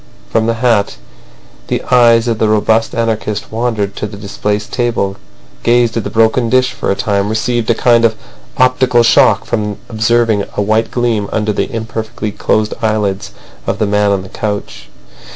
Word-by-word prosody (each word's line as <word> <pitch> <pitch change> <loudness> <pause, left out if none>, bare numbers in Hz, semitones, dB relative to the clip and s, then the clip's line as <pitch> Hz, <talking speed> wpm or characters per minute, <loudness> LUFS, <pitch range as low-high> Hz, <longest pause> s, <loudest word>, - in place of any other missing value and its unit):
From 110 0 +1
the 115 - +1
hat 115 - +1 0.7
the - - -2
eyes 120 -2 +5
of 115 -2 -1
the 110 - +2
robust 110 +1 +1
anarchist 110 -2 -2
wandered 110 -3 -2
to 105 - -3
the 100 -1 -10
displaced 105 +1 -3
table, 120 -5 -1 0.5
gazed 120 -1 +2
at 115 - -1
the - - -4
broken 115 +1 +2
dish 130 0 +2
for - - -4
a 100 - +2
time, 100 -2 -1
received 115 +1 -1
a 115 - +3
kind 120 0 +3
of 115 -1 +3 0.4
optical 130 -2 +3
shock 115 - +4
from 105 -1 -2
observing 110 -1 +1
a - - +2
white 110 +2 +1
gleam 115 -5 -1
under 105 -1 0
the - - -2
imperfectly 110 -1 -4
closed 110 +1 0
eyelids 105 -3 -1 0.4
of - - -1
the - - +1
man 105 0 +1
on 100 -2 0
the 95 - -11
couch. 105 -1 -5
110 Hz, 170 wpm, -14 LUFS, 105-115 Hz, 0.7 s, eyes